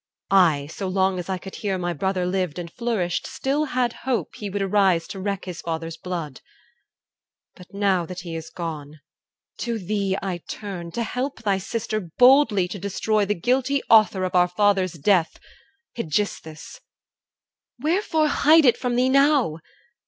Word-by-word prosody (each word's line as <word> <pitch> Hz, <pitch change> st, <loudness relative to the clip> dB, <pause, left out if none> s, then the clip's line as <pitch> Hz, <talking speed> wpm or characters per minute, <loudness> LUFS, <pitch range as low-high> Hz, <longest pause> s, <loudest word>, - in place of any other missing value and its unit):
I, 165 Hz, -7 st, +4 dB
so 190 Hz, +6 st, -6 dB
long 190 Hz, 0 st, +1 dB
as 180 Hz, -, -7 dB
I 190 Hz, -, -1 dB
could 190 Hz, +1 st, -9 dB
hear 195 Hz, -3 st, -2 dB
My 175 Hz, -1 st, -2 dB
brother 185 Hz, +3 st, -1 dB
lived 180 Hz, -3 st, -1 dB
and 170 Hz, -1 st, -6 dB
flourished, 220 Hz, -8 st, -2 dB
still 270 Hz, +3 st, -1 dB
had 250 Hz, -4 st, 0 dB
hope 255 Hz, -3 st, -2 dB
He 205 Hz, -, -6 dB
would 200 Hz, +1 st, -2 dB
arise 190 Hz, -4 st, +2 dB
to 195 Hz, -, -6 dB
wreak 195 Hz, -1 st, -3 dB
his 180 Hz, -2 st, -6 dB
father's 165 Hz, 0 st, -4 dB
blood. 165 Hz, -7 st, -6 dB, 1.1 s
But 180 Hz, -, -14 dB
now 195 Hz, -4 st, +1 dB
that 180 Hz, +1 st, -7 dB
he 170 Hz, -2 st, -7 dB
is 160 Hz, 0 st, -6 dB
gone, 155 Hz, -3 st, -6 dB, 0.6 s
to 235 Hz, -1 st, -2 dB
thee 200 Hz, -1 st, -1 dB
I 185 Hz, -3 st, -4 dB
turn, 180 Hz, -2 st, -7 dB
To 235 Hz, -, -1 dB
help 250 Hz, +3 st, -4 dB
thy 200 Hz, -3 st, +1 dB
sister 215 Hz, +2 st, -3 dB
boldly 215 Hz, -, +4 dB
to 200 Hz, -, -6 dB
destroy 205 Hz, +2 st, 0 dB
The 210 Hz, +1 st, 0 dB
guilty 260 Hz, +8 st, 0 dB
author 215 Hz, -4 st, +5 dB
of 185 Hz, -, -2 dB
our 180 Hz, -1 st, +4 dB
father's 190 Hz, -1 st, +1 dB
death, 170 Hz, +1 st, +1 dB, 0.6 s
Aegisthus. 160 Hz, -, -3 dB, 1.0 s
Wherefore 315 Hz, -, +1 dB
hide 310 Hz, +1 st, +5 dB
it 245 Hz, -, +5 dB
from 245 Hz, -1 st, -2 dB
thee 250 Hz, +1 st, +3 dB
now? 275 Hz, -, +3 dB
195 Hz, 160 wpm, -23 LUFS, 175-235 Hz, 1.1 s, author